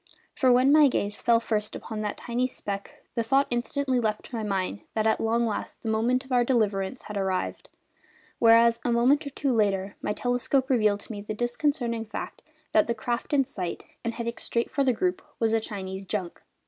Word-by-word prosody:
For 260 -2 +3
when 255 +3 +5
my 300 -1 +7
gaze 205 -5 -1
first 230 -1 +3
fell 210 -2 0
upon 220 -1 -5
that 210 -1 -3
tiny 245 +2 -1
speck 200 -5 -6
the 230 - 0
thought 270 +5 +3
instantly 255 +2 0
leapt 215 -2 -1
to 250 - -8
my 225 - -2
mind 190 - -2
that 215 -1 +1
at 220 - +2
long 230 +1 +2
last 220 - -4
the 220 - -1
moment 245 +4 +1
of 265 - -15
our 245 -1 +4
deliverance 215 -3 0
had 210 - -6
arrived; 190 -1 -2 0.7
whereas 230 0 +6
a 245 - +1
moment 260 +5 +3
or - - -3
two 275 -1 -1
later 200 -3 +1
my - - -1
telescope 250 +3 0
revealed 210 -4 +3
to - - -8
me 205 -2 -5
the 210 +1 -5
disconcerting 240 -1 -1
fact 215 - -6 0.3
that 215 - +4
the 235 - 0
craft 235 +2 -3
in 275 -2 +3
sight, 180 -7 -5 0.2
and 230 0 -2
heading 235 0 -4
straight 235 0 -2
for 280 - +1
the 260 - +3
group, 185 -6 -1 0.2
was 225 -1 +2
a 225 - +4
Chinese 190 -3 -6
junk! 190 -3 -4
230 Hz, 205 wpm, -27 LUFS, 210-245 Hz, 0.7 s, my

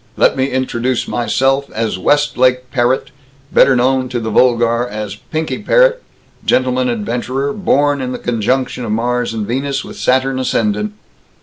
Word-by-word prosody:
Let - - +3
me 130 - +1
introduce 130 -2 -1
myself 135 +4 0
as 110 -4 -2
Westlake 130 0 +2
Parrott, 125 0 0 0.4
better 135 - +5
known 130 +1 +1
to 125 - -2
the 110 -1 -4
vulgar 120 0 +2
as 105 -3 -5
Pinky 155 - -4
Parrott, - - +3 0.4
gentleman 130 0 +1
adventurer, 120 +5 -2
born 145 -7 +1
in 125 -1 -3
the - - -4
conjunction 125 +2 -1
of 110 - -3
Mars 120 +2 -1
and 110 -2 -3
Venus, 135 +4 -2
with - - -10
Saturn 130 +1 +1
ascendant." 105 -4 -1
125 Hz, 145 wpm, -16 LUFS, 115-135 Hz, 0.4 s, better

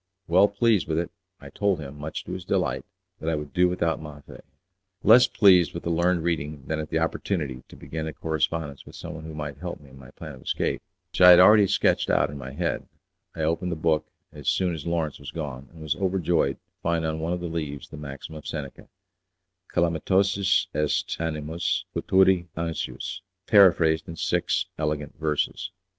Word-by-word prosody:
Well 95 +4 +5
pleased 105 0 +2
with 80 - -1
it 85 +1 -1 0.3
I - - -12
told 100 -4 0
him, 70 -1 -8
much 75 +1 -5
to - - -8
his 90 0 -5
delight, - - -1 0.3
that 80 - -2
I 80 - +1
would 75 -1 -6
do 90 0 +4
without 85 -3 -1
Maffei. 75 -2 -11 0.6
Less 120 +4 +7
pleased 90 -6 +5
with 85 - -5
the 85 - -1
learned 85 0 +2
reading 75 -4 -2
than 80 0 -2
at 75 -1 -5
the 80 - 0
opportunity 80 -5 -2
to - - -14
begin 80 0 -5
a 80 - -5
correspondence 80 -2 -2
with - - -13
someone 80 0 -8
who 80 -1 -8
might 75 -2 -6
help 90 +1 -5
me 70 -2 -17
in 65 - -14
my 65 -1 -13
plan 75 +2 -9
of 65 - -13
escape - - -1 0.3
(which - - -3
I 90 - +10
had 90 - +10
already 105 +2 +7
sketched - - +2
out - - +2
in 75 - -7
my 65 0 -7
head), 70 - -2 0.5
I - - -4
opened 85 +3 0
the - - -1
book 80 -1 +1 0.3
as 75 -3 -2
soon 90 -2 +1
as 80 0 -6
Lawrence 80 -3 -1
was 70 - -8
gone, 70 -5 -6
and 80 -2 -12
was 80 -1 0
overjoyed 90 -6 +1
to - - -36 0.2
find 85 -1 0
on 80 0 -2
one 80 +2 -1
of 90 - -2
the 90 - -5
leaves 75 -4 -4
the - - -9
maxim 70 +1 -8
of 75 -1 -9
Seneca, 70 -4 -6 0.8
'Calamitosus 95 +3 +2
est 75 -1 0
animus 85 +4 -2
futuri 95 0 +3
anxius', 85 0 -4 0.2
paraphrased 85 -6 +5
in 85 - -6
six - - 0
elegant 75 -1 -2
verses. 80 +3 -1
80 Hz, 195 wpm, -25 LUFS, 75-90 Hz, 0.8 s, I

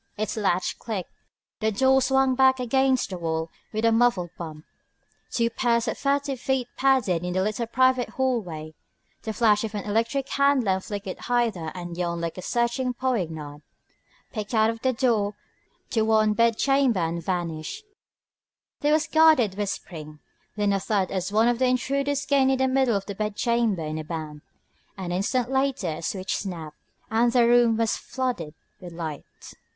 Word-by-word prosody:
Its 215 +1 -2
latch 185 -4 0
clicked. 205 -6 -5 0.5
The 220 -1 +1
door 265 +5 +4
swung 265 0 +3
back 260 0 +4
against 260 -1 +1
the 185 - -5
wall 160 -1 -2 0.2
with 220 +1 -1
a 230 - +5
muffled 225 -7 +2
bump. 155 -2 -8 0.6
Two 230 -1 0
pairs 235 0 +1
of - - -1
furtive 280 -1 -1
feet 260 -1 -1
padded 255 -11 +2
in 180 0 -2
the 185 +1 +1
little 215 +3 -2
private 255 +1 +2
hallway. 180 -13 -2 0.5
The 220 - -4
flash 215 -1 +3
of 215 -1 -4
an 205 - -3
electric 230 +6 0
hand 280 -2 +3
lamp 190 -2 0
flickered 200 -3 -6
hither 230 -10 0
and 175 -1 -6
yon 170 -1 -2
like 170 +2 -4
a - - -5
searching 240 +3 -1
poignard, 160 - -3 0.7
picked 215 0 -4
out 225 +1 +2
the 260 - +2
door 230 -5 +1 0.6
to 225 - +1
the 220 - +2
one 215 -1 +3
bedchamber 235 0 +2
and 165 +1 -2
vanished. 175 - -3 0.9
There 295 0 +2
was 310 +1 +2
guarded 315 -10 +4
whispering, 165 -6 -5 0.4
then 205 -1 +1
a 195 - +1
thud 195 -1 0
as 190 +1 -2
one 220 +3 +3
of 240 0 +1
the 260 - +3
intruders 275 +3 0
gained 265 -2 +3
the 265 - +3
middle 260 -3 +2
of 195 -1 -2
the 200 - -5
bedchamber 215 -1 0
in 155 +1 -3
a - - -4
bound. 155 -2 -6 0.6
An 185 -2 -4
instant 235 +7 0
later 265 -7 0
a 155 - -5
switch 185 +3 -2
snapped, 165 -6 -6 0.3
and 235 +2 +3
the 240 -1 +4
room 240 -2 +4
was 225 -1 +1
flooded 235 - -4 0.2
with 175 -2 -10
light. 160 -3 -5
220 Hz, 170 wpm, -25 LUFS, 180-255 Hz, 0.9 s, a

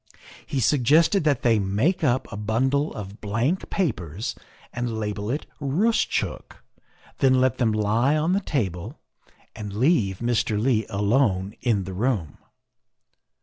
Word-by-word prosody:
He 135 - -2
suggested 150 - +3
that 145 -5 +1
they 115 -3 +4
make 110 - 0
up 130 -2 +1
a - - -5
bundle 130 +8 0
of 105 0 -8
blank 115 - -1
papers 105 - -2 0.4
and 120 -2 -3
label 105 0 -3
it 145 +5 -2
' - - -36
Roostchook,' 185 +12 -1 0.6
then 130 -2 +4
let 130 -2 +1
them 115 -3 +2
lie 110 +7 +2
on 160 +4 +1
the 195 - +2
table 95 - -3 0.6
and 105 -2 -6
leave 110 - +2
Mr. 115 -2 0
Leigh 110 -1 +1
alone 100 -2 +1
in 110 -6 +1
the 95 +1 -7
room. 100 - -1
115 Hz, 140 wpm, -24 LUFS, 105-140 Hz, 0.6 s, they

